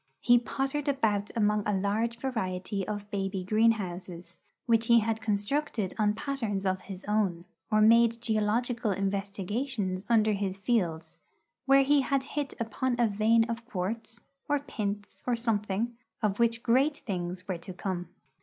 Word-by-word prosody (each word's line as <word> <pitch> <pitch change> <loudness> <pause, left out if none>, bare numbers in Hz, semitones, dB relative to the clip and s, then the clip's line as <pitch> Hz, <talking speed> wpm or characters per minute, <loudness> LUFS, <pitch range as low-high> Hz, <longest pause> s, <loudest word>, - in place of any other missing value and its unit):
He 245 0 +5
pottered 270 +4 -2
about 220 -7 +1
among 210 -1 +2
a 205 -2 +1
large 220 +4 0
variety 195 -6 -3
of 205 -1 -4
baby 195 -2 -2
greenhouses, 185 -5 0 0.3
which 230 -1 +2
he 235 -1 +6
had 220 0 -1
constructed 215 0 -1
on 210 -1 +2
patterns 225 -7 -2
of 185 0 0
his 190 0 -9
own, 200 -5 0 0.3
or 215 0 +4
made 230 +1 +5
geological 225 +1 0
investigations 195 +1 -2
under 220 -2 +4
his 195 -2 -1
fields, 175 -8 -1 0.5
where 275 0 +6
he 285 +1 +4
had 270 0 0
hit 285 0 -4
upon 240 +2 -1
a 240 - +4
vein 220 +2 +3
of 230 0 -4
quartz 225 +3 -4 0.3
or 290 0 +3
pintz, 205 -7 -5
or 245 - +2
something 225 0 -1 0.3
of 210 0 +1
which 235 0 +2
great 270 +5 +3
things 180 -3 -4
were 185 -3 -3
to 185 - -8
come. 180 -1 -4
215 Hz, 150 wpm, -29 LUFS, 195-235 Hz, 0.5 s, he